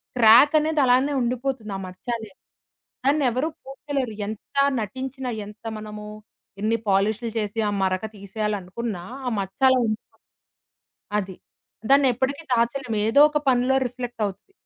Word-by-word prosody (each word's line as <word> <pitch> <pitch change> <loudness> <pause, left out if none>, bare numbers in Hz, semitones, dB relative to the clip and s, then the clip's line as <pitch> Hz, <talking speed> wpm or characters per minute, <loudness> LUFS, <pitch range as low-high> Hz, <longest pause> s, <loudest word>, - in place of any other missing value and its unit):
క్రాకనేది 290 +7 +6
అలానే 255 +3 +3
ఉండిపోతుంది 245 -3 -2
ఆ - - -6
మచ్చనేది. 215 +2 -6 0.7
నన్ను 290 +1 +3
ఎవరు 255 +6 0 0.2
పూడ్చలేరు. 270 -3 -4
ఎంత 215 +4 -8 0.3
నటించినా, 260 +4 -5 0.2
ఎంత 210 +1 -13
మనము 210 0 -8 0.6
ఇన్ని 225 +2 +1
పాలిష్లు 210 +4 +1
చేసి 210 +1 -2
ఆ - - -1
మరక 185 +2 0
తీసేయాలనుకున్నా 205 0 -4 0.2
ఆ - - +2
మచ్చలా 225 +8 +3
ఉండిపో 215 0 -5 1.0
అది. 190 -2 -8 0.5
దాన్నెప్పటకి 275 +2 +3
దాచలేము. 235 -1 0
ఏదో 280 +6 +5
ఒక 300 - +1
పనిలో 255 +1 +2
రిఫ్లెక్టవుతది. 240 - -5
235 Hz, 115 wpm, -24 LUFS, 210-265 Hz, 1.0 s, క్రాకనేది